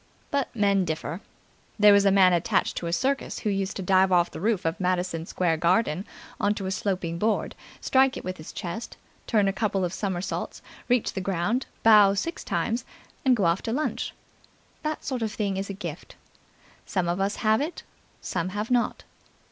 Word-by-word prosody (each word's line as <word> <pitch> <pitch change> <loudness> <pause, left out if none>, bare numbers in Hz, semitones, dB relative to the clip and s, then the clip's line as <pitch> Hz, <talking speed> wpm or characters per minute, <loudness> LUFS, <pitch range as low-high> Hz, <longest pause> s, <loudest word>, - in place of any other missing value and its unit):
But 280 -2 +1
men 200 -3 +3
differ. 160 +1 -4 0.6
There 210 -1 +7
was 200 0 +5
a 195 - +5
man 190 -2 +6
attached 170 - +1
to 170 - -3
a - - -2
circus 270 +11 0
who 210 - -1
used 195 0 -2
to 190 - -4
dive 190 +1 +4
off 175 -1 +3
the - - -7
roof 210 -3 0
of 165 0 -1
Madison 180 -2 -1
Square 170 -3 0
Garden 175 +1 +1 0.3
on 205 +1 +2
to 195 - -5
a 190 - -2
sloping 185 -4 -2
board, 215 +2 0 0.3
strike 265 0 +3
it - - -7
with 185 0 -4
his 155 - -9
chest, 180 +6 -6 0.3
turn 210 -4 +3
a 195 - +1
couple 200 -3 0
of 175 - -4
somersaults, 190 -2 -3 0.3
reach 245 -2 +2
the 190 - -3
ground, 195 +7 -1 0.2
bow 210 -3 +7
six 330 - -3
times 235 +2 -1 0.4
and 260 -3 +5
go 205 -6 +1
off 170 +2 +2
to 225 - -3
lunch. 300 +6 -2 0.7
That 310 0 -3
sort 255 -3 -2
of 220 -1 -1
thing 200 -3 -1
is 195 +1 -3
a - - -3
gift. 200 - -7 0.7
Some 185 -3 0
of 175 +2 -1
us 200 +1 0
have 220 +1 +2
it, 315 +4 -4 0.4
some 175 0 -2
have 215 +4 -3
not. 245 -1 +1
195 Hz, 195 wpm, -26 LUFS, 180-220 Hz, 0.7 s, There